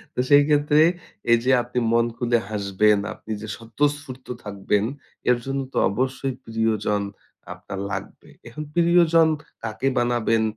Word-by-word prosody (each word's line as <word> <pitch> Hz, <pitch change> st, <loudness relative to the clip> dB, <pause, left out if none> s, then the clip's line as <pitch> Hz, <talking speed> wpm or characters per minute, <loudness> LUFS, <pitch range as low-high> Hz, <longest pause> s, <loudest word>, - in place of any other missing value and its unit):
তো, -, -, -4 dB
সেইক্ষেত্রে 145 Hz, +1 st, +5 dB, 0.5 s
এইযে, 120 Hz, +2 st, +4 dB
আপনি 125 Hz, +1 st, -2 dB
মন 115 Hz, 0 st, +4 dB
খুলে 120 Hz, -1 st, +2 dB
হাসবেন, 105 Hz, 0 st, +2 dB
আপনি 110 Hz, -, -11 dB
যে 110 Hz, -, -6 dB
স্বতঃস্ফূর্ত 130 Hz, +3 st, -3 dB, 0.2 s
থাকবেন, 100 Hz, 0 st, -1 dB, 0.5 s
এর 125 Hz, -, +5 dB
জন্য 135 Hz, 0 st, -2 dB
তো -, -, -4 dB
অবশ্যই 130 Hz, +5 st, -2 dB
প্রিয়জন 110 Hz, -2 st, 0 dB, 0.5 s
আপনার 100 Hz, -, -8 dB
লাগবে। -, -, -7 dB, 0.2 s
এখন 120 Hz, +6 st, -7 dB
প্রিয়জন 170 Hz, -1 st, +4 dB, 0.4 s
কাকে 110 Hz, +3 st, -2 dB
বানাবেন 120 Hz, -2 st, +1 dB
120 Hz, 125 wpm, -23 LUFS, 110-145 Hz, 0.5 s, সেইক্ষেত্রে